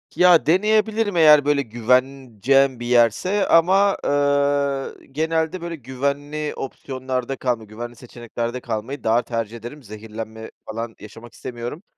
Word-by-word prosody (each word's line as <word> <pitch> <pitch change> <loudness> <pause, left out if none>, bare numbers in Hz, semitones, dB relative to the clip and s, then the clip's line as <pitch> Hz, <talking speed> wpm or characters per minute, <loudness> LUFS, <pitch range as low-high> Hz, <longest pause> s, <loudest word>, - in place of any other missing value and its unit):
Ya, 180 -2 +5
deneyebilirim 215 +3 +2
eğer, 150 -3 +7
böyle 145 -1 +2
güveneceğim 130 +1 +1
bir 120 - -6
yerse 125 - +2
ama, 190 +4 +4
ııı, 140 -1 0
genelde, 160 +4 -1
böyle, 170 0 -5
güvenli 140 +3 -3
opsiyonlarda 130 -1 -4
kalma 125 -4 -2
güvenli 120 +3 -8
seçeneklerde 120 0 -6
kalmayı 120 +4 -5
daha 115 +2 +3
tercih 115 -1 -4
ederim. 120 +6 -10
Zehirlenme 110 +1 -8 0.2
falan 115 +1 -5
yaşamak 115 +2 -12
istemiyorum 125 - -7
130 Hz, 120 wpm, -22 LUFS, 115-150 Hz, 0.2 s, eğer